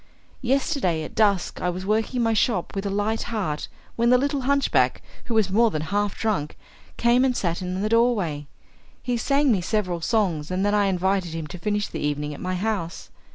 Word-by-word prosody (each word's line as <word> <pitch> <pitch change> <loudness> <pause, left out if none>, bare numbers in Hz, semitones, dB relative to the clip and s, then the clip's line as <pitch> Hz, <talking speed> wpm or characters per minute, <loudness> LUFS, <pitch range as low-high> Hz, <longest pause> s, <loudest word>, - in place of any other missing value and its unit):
Yesterday, 255 - 0
at - - -8
dusk, 200 -4 +1
I 180 - +1
was 180 +1 -4
working 220 +5 0
in 240 - +2
my 225 0 +2
shop 215 -4 +1
with 195 +1 -2
a - - -1
light 205 +3 0
heart 190 -10 -2 0.3
when 235 0 +2
the 250 - +6
little 280 +1 0
hunchback, 280 +2 +2 0.2
who 235 - -2
was 210 -4 +2
more 230 +3 +4
than 155 -6 -3
half 205 +3 -1
drunk, 205 -10 -1 0.4
came 240 +2 +4
and 255 -2 +1
sat 170 -1 -1
in 185 +1 -3
the - - +1
doorway. 205 - +1 0.6
He 245 - 0
sang 275 +3 +2
me 200 -5 +2
several 180 -3 -1
songs, 175 -7 0
and 185 +2 0
then 205 - +2
I 205 -1 +3
invited 190 -2 0
him 165 -1 -4
to 160 +4 -9
finish 205 +1 -1
the - - -6
evening 150 0 -2
at - - -9
my 185 0 -2
house. 190 -3 -3
205 Hz, 205 wpm, -24 LUFS, 180-230 Hz, 0.6 s, the